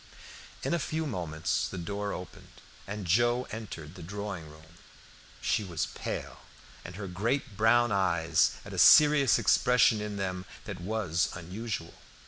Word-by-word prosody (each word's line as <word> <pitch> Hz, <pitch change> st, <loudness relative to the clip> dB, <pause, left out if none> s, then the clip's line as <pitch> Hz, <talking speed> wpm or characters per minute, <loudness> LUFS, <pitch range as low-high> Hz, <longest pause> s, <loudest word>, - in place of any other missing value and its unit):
In -, -, 0 dB
a 170 Hz, -, +1 dB
few 160 Hz, +2 st, -2 dB
moments 85 Hz, -, -2 dB
the 95 Hz, -, -7 dB
door 100 Hz, +4 st, -3 dB
opened, 90 Hz, -2 st, -9 dB, 0.3 s
and 100 Hz, 0 st, -5 dB
Joe 120 Hz, +7 st, +2 dB
entered 95 Hz, -9 st, -7 dB
the 90 Hz, -, -11 dB
drawing 100 Hz, -2 st, -6 dB
room. 80 Hz, +3 st, -17 dB, 0.6 s
She 110 Hz, -, +1 dB
was 85 Hz, -8 st, -2 dB
pale, -, -, -5 dB, 0.4 s
and 85 Hz, -, -9 dB
her 100 Hz, +1 st, -6 dB
great 115 Hz, +6 st, -2 dB
brown 120 Hz, +3 st, +4 dB
eyes 85 Hz, -4 st, +2 dB
had -, -, -9 dB
a -, -, -3 dB
serious 145 Hz, -7 st, +7 dB
expression 125 Hz, -3 st, +4 dB
in 105 Hz, -1 st, -4 dB
them 95 Hz, -1 st, -3 dB, 0.2 s
that 95 Hz, -4 st, -7 dB
was 90 Hz, -4 st, 0 dB
unusual. 90 Hz, 0 st, -5 dB
100 Hz, 145 wpm, -29 LUFS, 85-115 Hz, 0.6 s, serious